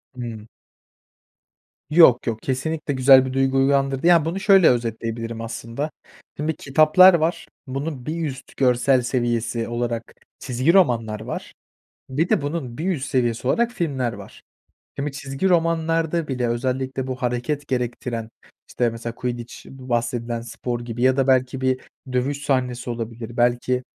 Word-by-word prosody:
Hıı. 115 -3 -7 1.4
Yok, 150 -7 +6
yok. 115 -2 -1
Kesinlikle 145 +3 -2
güzel 130 0 +6
bir 130 - -4
duygu 135 0 +1
uyandırdı. 135 +2 +2
Ya, 170 -3 +5
bunu 170 +4 -2
şöyle 195 -4 +6
özetleyebilirim 115 -1 -2
aslında. 115 +6 -5 0.5
Şimdi 155 +2 -2
kitaplar 155 +7 +6
var. 170 +1 0 0.2
Bunun 135 -1 -4
bir 165 +1 -2
üst 135 -1 -9
görsel 125 0 +3
seviyesi 120 -2 -1
olarak 120 -1 -3 0.3
çizgi 130 +7 +1
romanlar 115 - +2
var. 110 - -6 0.6
Bir 150 +7 0
de - - +2
bunun 145 -5 -4
bir 180 +5 -1
üst 140 -6 -3
seviyesi 120 -3 0
olarak 235 - +2
filmler 135 - -2
var. - - -12 0.6
Şimdi, 140 +1 -2
çizgi 140 +6 -2
romanlarda 165 -1 +1
bile 125 -3 -1
özellikle 130 +2 -2
bu 130 - -3
hareket 125 +4 -2
gerektiren, 120 -2 -3 0.4
işte, 120 0 0
mesela 115 0 -6
Quidditch, 120 -1 -5 0.2
bu 130 -1 -12
bahsedilen 120 0 -1
spor 120 +1 -5
gibi 120 0 -6
ya 130 +1 +3
da 135 - +2
belki 130 0 +2
bir 130 0 +1 0.3
dövüş 135 +3 -1
sahnesi 125 -3 -1
olabilir, 115 0 -6
belki, 120 +1 +1
130 Hz, 145 wpm, -22 LUFS, 120-145 Hz, 1.4 s, Yok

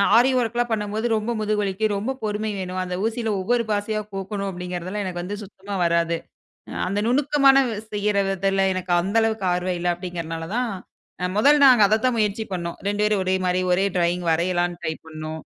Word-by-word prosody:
ஆரி 245 +3 +6
ஒர்க்லாம் 240 0 0
பண்ணும்போது 215 +1 -1
ரொம்ப 215 +2 -2
முதுகு 215 0 0
வலிக்கும். 205 +2 0
ரொம்ப 215 +6 -2
பொறுமை 215 0 -2
வேணும். 185 0 -4
அந்த 180 0 -4
ஊசியில 225 0 -1
ஒவ்வொரு 235 +5 +1
பாசியா 210 +1 -1
கோக்கணு 195 +1 -4
அப்படிங்கிறதுலாம் 180 +2 -4
எனக்கு 175 -2 -4
வந்து 200 +3 -4
சுத்தமா 200 0 -8
வராது. 170 0 +1 0.7
அந்த 200 +2 -1
நுணுக்கமான 275 +1 +4 0.3
செய்யற 210 -1 0
வித்துல 195 0 +1
எனக்கு 185 -1 -4
அந்த 195 +5 -3
அளவுக்கு 220 -3 0
ஆர்வம் 180 0 -1
இல்ல 175 - -2
அப்படிங்கிறனாலதான், 175 +6 -4 0.7
முதல் 285 +6 +5
நாங்க 250 -4 +7
அதத்தான் 225 +4 +2
முயற்சி 210 0 0
பண்ணோம். 170 -2 -4
2 205 +1 0
பேரு 210 0 +3
ஒரே 185 0 +1
மாரி 180 0 +1
ஒரே 190 +2 +3
ட்ராயிங் 175 0 +1
வரையலானுட்ரை 175 0 0
பண்ணோம். 155 0 -6
200 Hz, 160 wpm, -23 LUFS, 180-220 Hz, 0.7 s, நாங்க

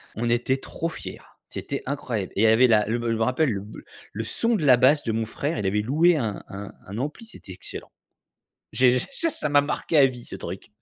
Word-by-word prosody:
On 120 +2 -1
était 120 +3 +1
trop 165 +4 -4
fiers! - - -8 0.3
C'était - - -5
incroyable! 125 -8 -3
Et 100 - +1
il - - +4
y - - +6
avait 115 +4 +6
la 105 -3 +3
le 115 +2 -1
je 115 -1 -1
me 110 - -3
rappelle 130 +4 +1
le 100 - -3
b 105 +2 -11 0.4
le 110 +2 -3
son 230 - +1
de 155 -8 -1
la 125 -3 +7
basse 140 +4 +4
de 115 - -1
mon 110 0 -1
frère. 145 +8 -3
Il 100 - -1
avait 105 +2 +1
loué 160 +9 +3
un 110 -6 -3
un 100 +1 -7 0.2
un 100 - -7
ampli, 150 - -4
c'était 215 - -12
excellent! 90 - -8 0.8
J'ai 125 0 +4
ça 330 - -2
ça 150 - -2
m'a 145 0 +5
marqué 150 +2 -1
à 140 - +8
vie 125 -2 -4
ce - - -8
truc! 90 +5 -7
125 Hz, 240 wpm, -24 LUFS, 110-145 Hz, 0.8 s, à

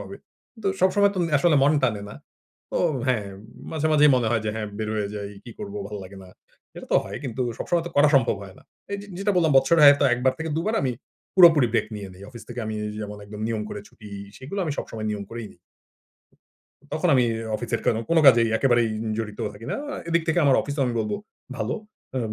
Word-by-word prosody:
হবে। - - -8 0.5
তো - - -3
সবসময় 200 +2 +4
তুম 180 - 0
আসলে 155 +1 +3
মন 145 +2 +5
টানে 110 -5 +1
না। 105 - -9 0.6
তো - - -2 0.3
হ্যাঁ, 110 -6 +1 0.5
মাঝে 160 -1 0
মাঝেই 150 -1 +6
মনে 120 -3 +1
হয় 120 -2 +2
যে 105 - 0
হ্যাঁ 110 -1 -3
বের 110 - -2
হয়ে 105 -2 -1
যাই, 100 -1 -5 0.2
কি 120 - -9
করব 205 -1 -7
ভাল 105 - -6
লাগে 95 +2 -12
না। 95 - -13 0.5
এটাতো - - -4
হয় - - -6
কিন্তু 130 0 -2 0.2
সবসময় 175 -1 0
তো - - -5
করা 145 +1 +6
সম্ভব 130 -6 +3
হয় 95 -1 -11
না। - - -18 0.3
এইযে 200 0 -5
যেটা 200 +1 +1
বললাম 165 -4 +3
বছরে 155 +5 +3
হয়তো 145 0 +7
একবার 125 +1 +1
থেকে 160 0 -3
২বার 210 +7 0
আমি 130 -2 0 0.4
পুরাপুরি 165 -8 +7
ব্রেক 115 - +1
নিয়ে 100 -2 -7
নেই। 95 - -14
অফিস 120 -2 -11
থেকে 120 0 -5
আমি 110 - -3 0.3
যেমন 105 -1 -6
একদম 105 +1 -9
নিয়ম 110 -2 -2
করে 105 - -6
ছুটি 105 -2 -14 0.3
সেগুলো 140 +10 -6
আমি 155 - -2
সবসময় 110 -1 -5
নিয়ম 105 -1 -4
করেই 115 -1 -6
নিই। - - -26 1.3
তখন - - 0
আমি 125 -2 +4 0.3
অফিসের 120 0 -3
কেনো, 115 - +2
কোনো 165 -1 +5
কাজেই 115 -3 +7
একেবারেই 120 -2 +3 0.3
জড়িত 105 -2 -5
থাকি 105 +3 -11
না। - - -1 0.2
আ - - -4
এদিক 170 0 +2
থেকে 160 - +2
আমার 135 -2 +5
অফিসেও 145 0 -2
আমি 120 - -2
বলবো 110 - -2 0.4
ভালো। - - -2 0.4
আম 115 -4 -2
125 Hz, 210 wpm, -24 LUFS, 110-160 Hz, 1.3 s, হয়তো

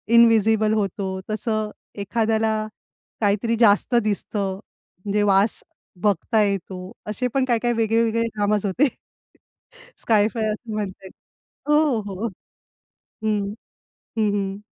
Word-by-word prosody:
Invisible 220 -2 +5
होतो, 200 -2 -1 0.2
तसं 215 0 -1 0.3
एखाद्याला 220 +1 +1 0.7
काहीतरी 210 +3 +2
जास्त 220 +2 +4
दिसतं, 200 -2 -1 0.5
म्हणजे 205 +1 +1
वास 195 +3 +3 0.4
बघता 210 +2 +2
येतो 190 -1 -3 0.2
असे 230 +4 -1
पण 270 -1 +2
काही-काही 240 -1 +1
वेगळे-वेगळे 230 +1 +2
ड्रामाज 205 0 +1
होते. 240 +10 +3 1.2
स्काय-फाय 220 0 +2
असं 220 +2 -6
म्हणता 195 -2 -4
येईल. - - -12 0.6
हो, 295 -6 +3
हो, 200 -2 -6
हो. 230 - 0 1.0
हं. 205 -2 0 0.7
हं, 215 -1 +3
हं. 195 -1 -2
215 Hz, 110 wpm, -23 LUFS, 200-230 Hz, 1.2 s, Invisible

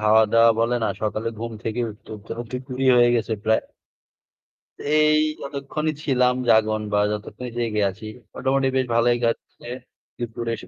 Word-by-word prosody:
খাওয়া-দাওয়া 110 +2 +5
বলেন 120 +1 +1
আ - - 0
সকালে 110 +1 -1
ঘুম 115 +1 -5
থেকে 115 +2 -2
উঠতে, 105 - -16
উঠতে 105 +1 -9
অ - - -2
দুপুরই 130 +1 -3
হয়ে 120 0 +6
গেছে 115 0 -1
প্রায়। 110 0 +3 1.2
তে - - -9 0.2
এই 155 0 +4 0.2
যতক্ষণই 140 +3 -3
ছিলাম 125 -2 +2
জাগন 110 -1 +4
বা 105 - +3
যতক্ষণই 110 +4 -6
জেগে 110 -3 0
আছি 95 +3 -10 0.3
মোটামুটি 135 +1 +1
বেশ 130 - +2
ভালোই 120 +1 +3
কাটছে। 115 0 -3 0.5
দুপুরে 115 0 -4
এসে 90 - -11
115 Hz, 155 wpm, -23 LUFS, 110-125 Hz, 1.2 s, হয়ে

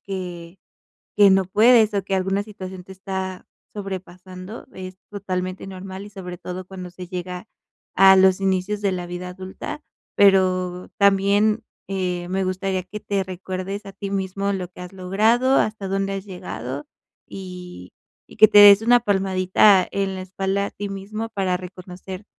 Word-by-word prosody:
que 180 -2 -7 0.6
que 200 -1 +7
no 190 0 +4
puedes, 220 +2 +5
o 200 - +1
que 195 - -2
alguna 190 +2 0
situación 190 -3 -9
te - - -17
está 190 -1 -5 0.3
sobrepasando. 185 0 -8
Es 185 0 -8
totalmente 185 -2 -4
normal, 190 +1 -8
y - - -12
sobre 180 -3 -8
todo 180 +1 -7
cuando 185 -2 -8
se 180 0 -9
llega 180 +2 -6 0.5
a 190 0 +7
los 190 0 +5
inicios 195 +2 0
de 200 - +2
la 180 -1 -4
vida 180 +1 -6
adulta. 185 +1 -7 0.3
Pero 185 -2 +3
también, 200 +2 +3 0.3
eh, 180 -2 -2
me 190 +1 -1
gustaría 185 0 -2
que 210 +3 -7
te 200 -1 -1
recuerdes 190 +2 -5
a 195 - -8
ti 200 0 -6
mismo 195 +1 -2
lo 185 -3 -3
que 180 - -14
has 180 +1 -9
logrado, 220 +8 +2
hasta 215 -2 0
dónde 195 0 -1
has 195 0 -5
llegado, 145 -7 -6 0.4
y 180 - -9 0.4
y - - -15
que 215 - +9
te 210 - +6
des 205 0 +9
una 245 +2 +6
palmadita 190 -2 +3
en 195 -1 -2
la 185 - -5
espalda 195 +1 -2
a - - -7
ti 205 0 -5
mismo 215 +3 -5
para 190 -4 0
reconocer, 185 +1 -9
190 Hz, 165 wpm, -22 LUFS, 185-200 Hz, 0.6 s, que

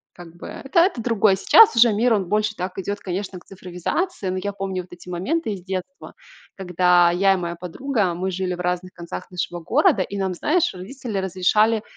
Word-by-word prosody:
как 170 -1 -13
бы - - -10
это 275 +5 -1
это 340 - +1
другое. 220 -4 +3
Сейчас 450 - +6
уже 230 -1 +6
мир, 230 +3 +2
он 200 -3 0
больше 215 +3 0
так 180 0 -5
идет, 200 +2 -4
конечно, 190 0 -5
к - - -24
цифровизации, 190 - -4
но 185 - -2
я 205 - -2
помню 195 -2 -4
вот 180 - -21
эти 175 0 -13
моменты 215 - -2
из 185 -3 -9
детства, 190 +8 -6 0.4
когда 180 -2 +3
я 195 +2 +3
и - - -2
моя 170 -1 -4
подруга- 185 +3 -2
мы 185 +2 -2
жили 185 0 -2
в 175 - -14
разных 180 +1 -2
концах 170 +2 -8
нашего 175 -1 -4
города- 180 +3 +2
и 200 - -7
нам, 190 -2 -1
знаешь, 335 - +1
родители 215 +4 -7
разрешали, 210 +4 +2
190 Hz, 200 wpm, -22 LUFS, 180-215 Hz, 0.4 s, Сейчас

